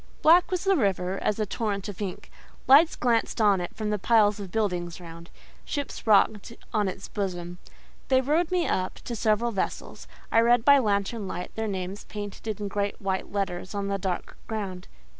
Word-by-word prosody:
Black 345 +3 +6
was 365 -2 -1
the 390 0 +3
river 195 - 0
as 210 - +1
a 215 - 0
torrent 200 -1 -3
of 205 -1 -7
ink; 190 -3 -5 0.4
lights 300 +5 +7
glanced 235 -1 0
on 205 -4 +4
it 175 - -6
from 215 -1 -2
the 210 - -1
piles 210 -1 +3
of 195 -3 -7
building 180 -6 -1
round, 170 -1 -11 0.3
ships 285 -4 -5
rocked 210 +1 +3 0.2
on 210 -2 +2
its 190 +1 -5
bosom. 180 -3 -4 0.5
They 260 -1 +4
rowed 310 +6 +1
me 360 -2 +1
up 185 0 -1
to 235 - -6
several 225 +2 +1
vessels; 195 - -4 0.2
I 225 - +5
read 235 0 +4
by 280 -1 +7
lantern 205 -1 -1
light 180 -1 -6
their 220 0 -3
names 190 0 -4
painted 210 0 -6
in 205 - -3
great 200 0 -2
white 190 -1 -2
letters 190 -1 -3
on 200 0 -2
a 195 - -1
dark 185 -2 -3
ground. 195 -5 -5
205 Hz, 185 wpm, -26 LUFS, 190-230 Hz, 0.5 s, lights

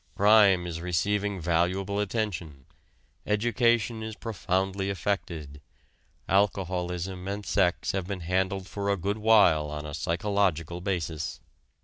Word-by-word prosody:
Crime 100 -3 +5
is 85 -1 -5
receiving 100 +3 0
valuable 90 +4 0
attention, 95 - -3 0.6
education 115 +1 +1
is 110 -1 -5
profoundly 95 -3 -2
affected, 85 -7 -3 0.7
alcoholism 95 -2 -1
and 100 +1 -4
sex 90 -3 +1
have 95 -2 -3
been 95 -2 -4
handled 95 +2 -1
for 100 +1 -4
a 100 - +2
good 100 +4 -2
while 100 -9 +5
on 75 0 -5
a 75 - -6
psychological 85 0 -1
basis. 85 -5 -3
95 Hz, 115 wpm, -27 LUFS, 85-100 Hz, 0.7 s, Crime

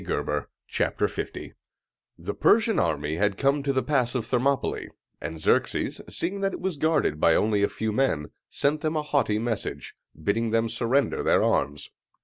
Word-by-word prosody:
LEONIDAS - - -2 0.3
AT - - 0
THERMOPYLÆ - - -3 0.6
The - - -4
Persian 225 -1 +3
army 75 -1 0
had 105 +1 +1
come 140 +1 +2
to 140 0 0
the 130 -1 0
Pass 130 -4 +1
of 120 -3 -1
Thermopylæ; 130 +2 0 0.3
and 80 -1 -5
Xerxes, - - +1
seeing 195 +4 -3
that 195 -1 0
it - - -5
was 185 -4 -2
guarded 155 - +1
by 80 - +5
only 105 -1 +2
a 100 - +3
few 110 0 -2
men, 105 - 0 0.2
sent 150 +2 0
them 155 0 -1
a 155 - 0
haughty 140 -8 +1
message, 115 -1 -3 0.3
bidding 110 +7 0
them 115 +1 +1
surrender 130 +5 +1
their - - +3
arms. 75 0 0
120 Hz, 170 wpm, -26 LUFS, 100-145 Hz, 0.6 s, by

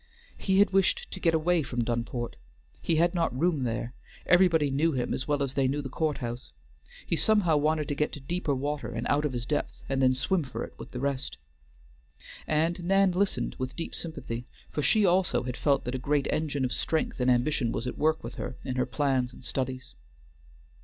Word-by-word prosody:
He 190 -1 +1
had 200 0 +5
wished 195 -1 +2
to - - -6
get 165 -2 +3
away 170 +2 +2
from 125 -4 -2
Dunport; 120 +1 -2 0.5
he 165 - +1
had 170 +2 +3
not 165 -7 0
room 160 -6 +2
there; 120 +1 -3 0.3
everybody 170 -5 +4
knew 155 +4 +2
him 125 -2 -1
as 130 - -3
well 145 -1 +1
as 135 -1 -2
they 135 -2 +2
knew 145 +2 -1
the 135 - -5
courthouse; 125 -5 -3 0.5
he - - +1
somehow 180 -4 +4
wanted 150 0 +1
to - - -1
get 150 +1 0
to - - -6
deeper 150 +1 -1
water, 145 -1 -2
and 115 0 -3
out 145 +1 +2
of 150 - 0
his 120 -2 -3
depth, 145 +3 -2
and 135 -1 0
then 130 -1 +4
swim 170 +8 +1
for 130 -4 -5
it - - -8
with - - -8
the 125 - -6
rest. 130 - -2 1.1
And 165 +3 +1
Nan 195 +1 +4
listened 190 +2 0
with 130 0 -3
deep 165 - -5
sympathy, 120 -7 -5 0.2
for 150 - -1
she 210 +7 +4
also 180 -4 +2
had 125 0 -4
felt 140 0 +2
that 125 - -4
a 130 - -2
great 140 +1 +1
engine 145 -4 0
of 125 - -1
strength 160 -3 -1
and 125 0 +2
ambition 125 0 +2
was 115 - -3
at 125 - -4
work 155 +1 +2
with 115 +2 -6
her 125 - -5
in 130 -1 -3
her 125 -1 +1
plans 130 -2 0
and 130 - -13
studies. 130 0 -3
145 Hz, 210 wpm, -28 LUFS, 130-165 Hz, 1.1 s, had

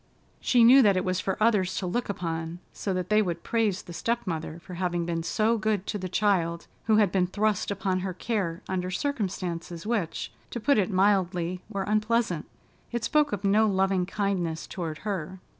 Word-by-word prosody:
She 245 -2 +4
knew 255 +4 +9
that 200 -5 +4
it 185 - 0
was 185 0 0
for 190 0 -1
others 210 -5 +2
to 190 - -2
look 235 +7 -2
upon, 165 -3 -3 0.2
so 200 - -3
that 185 -1 -2
they 215 0 +5
would 175 -4 -2
praise 220 -5 0
the 175 - -10
step 235 +7 -1
mother 160 -2 -4
for 180 +2 -11
having 175 -1 -1
been 165 -1 -1
so 215 +8 +1
good 210 -2 0
to 205 - -3
the 185 0 -4
child 175 -4 +1 0.2
who 220 - +4
had 210 -4 +4
been 180 -1 +2
thrust 210 +1 0
upon 190 -2 -1
her 185 0 -3
care 185 -6 -2
under 185 -1 -2
circumstances 185 - -3
which, 210 -7 -2 0.2
to 240 - -4
put 280 +2 +3
it 195 - +1
mildly, 185 -3 +1
were 200 -3 -2
unpleasant. 215 -4 0 0.4
It 235 -1 -2
spoke 300 +3 +2
of 205 -1 -3
no 210 +2 +4
loving 190 -2 +1
kindness 185 -5 -1
toward 165 -4 -5
her. 190 -3 -3
190 Hz, 190 wpm, -27 LUFS, 175-215 Hz, 0.4 s, knew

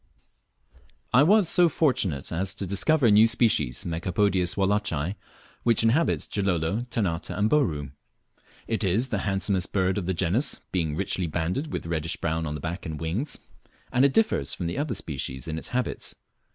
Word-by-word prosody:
I 125 - +7
was 200 +5 +5
so 175 +1 +4
fortunate 105 - 0
as 95 +3 -2
to 100 - -3
discover 130 - +2
a 115 - +6
new 105 +2 +7
species 90 - +1
(Megapodius 90 +2 0
wallacei), 95 -5 0 0.5
which 115 -1 +3
inhibits 130 +9 +2
Gilolo, 95 +3 -1
Ternate, 90 -9 -1
and 105 +1 0
Bouru. 80 - +1 0.8
It 110 -1 0
is 105 +7 +1
the 105 - -1
handsomest 95 -1 0
bird 95 0 +1
of 90 - -5
the 95 - 0
genus, 95 - 0
being 80 -5 -1
richly 95 0 -1
banded 90 - -2
with - - -4
reddish 80 0 -2
brown 80 0 -2
on 75 - -3
the - - -5
back 85 +5 -5
and 80 -2 -5
wings; 95 - -2 0.6
and 125 - +4
it 140 - +5
differs 215 - +1
from 90 - -4
the 85 +11 -2
other 150 +1 -1
species 65 -3 -5
in 80 0 -3
its - - -1
habits. 125 0 -2
95 Hz, 170 wpm, -26 LUFS, 80-115 Hz, 0.8 s, I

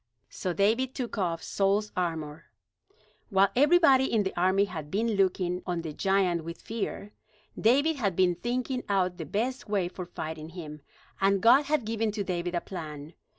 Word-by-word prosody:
So 185 - -3
David 225 +8 +1
took 240 -4 -4
off 170 -3 -1
Saul's 200 +2 0
armor. 160 -4 -3 0.8
While 195 -2 +4
everybody 280 -2 +5
in 220 -3 +2
the 190 - -4
army 185 +3 +3
had 160 -6 -7
been 220 +7 0
looking 185 -3 +1
on 175 -2 -2
the 155 -2 -5
giant 190 -2 +1
with 170 +1 -7
fear, 210 -2 -5 0.4
David 285 +7 +3
had 200 -8 0
been 180 -1 +3
thinking 250 +6 -2
out 185 -3 +1
the 160 - -6
best 235 - -2
way 195 -4 +1
for 180 0 -7
fighting 160 -2 -6
him; 155 -4 -9 0.4
and 195 0 +3
God 255 +8 +6
had 290 -4 0
given 225 0 -1
to 205 -2 -2
David 175 -1 -3
a 175 - 0
plan. 155 -4 -8
195 Hz, 170 wpm, -28 LUFS, 175-225 Hz, 0.8 s, God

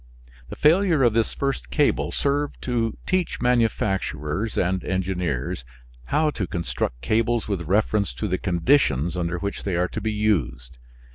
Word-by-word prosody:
The - - -6
failure 165 -1 +4
of 120 -3 +4
this 115 0 +1
first 135 -1 -2
cable 150 -2 +1
served 145 +1 -1
to 115 -3 -1
teach 185 -2 0
manufacturers 105 - 0
and 90 +1 +1
engineers 90 -10 -2 0.4
how 150 +1 +2
to 100 -10 -3
construct 80 -8 -3
cables 115 +1 +1
with 95 -6 -3
reference 105 +2 +1
to 105 - -2
the 95 -1 -1
conditions 85 - +2
under 85 -1 -1
which 100 +3 -4
they 95 -3 -1
are 90 +1 +1
to - - -5
be 110 - -1
used. 70 - -1
100 Hz, 150 wpm, -24 LUFS, 85-120 Hz, 0.4 s, failure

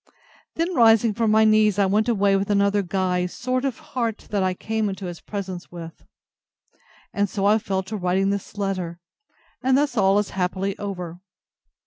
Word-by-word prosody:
Then 335 +3 -1
rising 225 -4 +5
from 225 +1 0
my 220 +1 +5
knees, 215 -2 +4
I 200 - +4
went 210 +4 +1
away 200 -3 +3
with 195 +1 -1
another 200 0 +3
guise 180 -1 -1
sort 255 +1 -1
of 265 -4 -2 0.2
heart 230 -4 -2
than 205 -2 +1
I 185 -1 0
came 220 +1 -2
into 195 0 -6
his 175 -2 -7
presence 190 -3 -6
with: 165 -2 -9 1.1
and 205 0 0
so 195 +1 -2
I 210 +2 +4
fell 190 -2 -2
to 205 +4 -6
writing 190 +1 +1
this 200 +1 -5
letter. 185 -4 -3 0.6
And 260 0 +3
thus 285 -3 +1
all 195 -2 +4
is 205 -1 0
happily 190 +1 -1
over. 180 -4 -5
200 Hz, 175 wpm, -23 LUFS, 190-220 Hz, 1.1 s, rising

